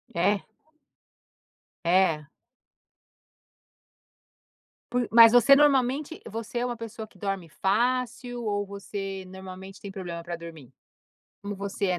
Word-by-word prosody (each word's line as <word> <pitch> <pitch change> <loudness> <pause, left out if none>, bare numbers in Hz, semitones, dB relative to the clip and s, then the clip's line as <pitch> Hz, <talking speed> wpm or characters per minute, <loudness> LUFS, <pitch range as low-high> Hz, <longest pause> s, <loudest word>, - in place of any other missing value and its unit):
É. 195 +4 +2 1.4
É? 170 -4 +3 2.7
Por 245 -1 +1
mas 230 -1 +9
você 245 +3 +8
normalmente 280 +1 +2
você 225 +2 -4
é 245 - 0
uma 240 -2 -3
pessoa 225 -1 -7
que 205 - -22
dorme 195 -3 -3
fácil? 245 - -1
Ou 205 -1 -1
você 195 -1 -6
normalmente 190 +1 -10
tem 200 - -7
problema 175 -3 -6
para 175 0 -4
dormir? 160 -6 -11 0.7
Como 200 0 -5
você 200 0 -2
é? - - -6
200 Hz, 115 wpm, -27 LUFS, 190-240 Hz, 2.7 s, mas